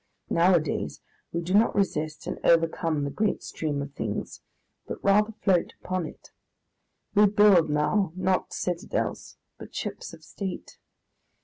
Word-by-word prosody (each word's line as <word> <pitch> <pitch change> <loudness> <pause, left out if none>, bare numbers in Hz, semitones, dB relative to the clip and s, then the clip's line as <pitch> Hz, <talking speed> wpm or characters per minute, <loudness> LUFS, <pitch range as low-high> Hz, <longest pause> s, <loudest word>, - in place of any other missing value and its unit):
Nowadays 170 -2 +2 0.3
we 170 - -2
do 175 +2 -3
not 215 +3 +4
resist 155 -6 -1
and - - -4
overcome 165 -2 +2
the 140 - -2
great 210 +5 -1
stream 145 -3 -3
of 140 0 -9
things, 110 -6 -4 0.5
but - - -4
rather 210 +2 +4
float 185 -4 +2
upon 185 -3 -2
it. - - -14 0.8
We 210 0 +6
build 200 -5 +5
now 155 +5 +1
not 185 0 0
citadels, 175 -1 -3 0.2
but - - -11
ships - - -5
of - - -14
state. 190 -3 -7
175 Hz, 135 wpm, -27 LUFS, 155-195 Hz, 0.8 s, We